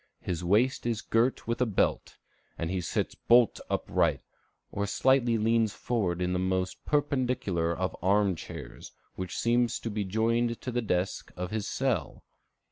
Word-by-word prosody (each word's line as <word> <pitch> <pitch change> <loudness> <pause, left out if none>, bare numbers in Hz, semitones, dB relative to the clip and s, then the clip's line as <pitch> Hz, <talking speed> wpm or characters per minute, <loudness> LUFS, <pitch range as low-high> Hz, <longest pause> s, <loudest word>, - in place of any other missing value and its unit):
His 90 -1 -3
waist 115 +8 +2
is 115 -3 0
girt 115 +3 +1
with 115 +1 -1
a 125 - +3
belt; 105 - 0 0.4
and 85 +1 -3
he 95 -1 -1
sits 85 - -2
bolt 120 -1 +4
upright, - - +1 0.5
or 100 0 -2
slightly 125 0 +3
leans 110 -1 +2
forward 90 -7 -1
in 90 0 0
the 90 - 0
most 95 0 -1
perpendicular 125 - 0
of 95 0 -2
arm 100 +1 +3
chairs, - - -9 0.2
which 95 -1 -5
seems 120 0 +2
to 115 - -5
be 105 0 -1
joined 115 +4 0
to 130 - -4
the 120 0 0
desk 90 -4 -2
of 90 0 -4
his 110 -2 -2
cell. - - -1
110 Hz, 160 wpm, -29 LUFS, 95-120 Hz, 0.5 s, bolt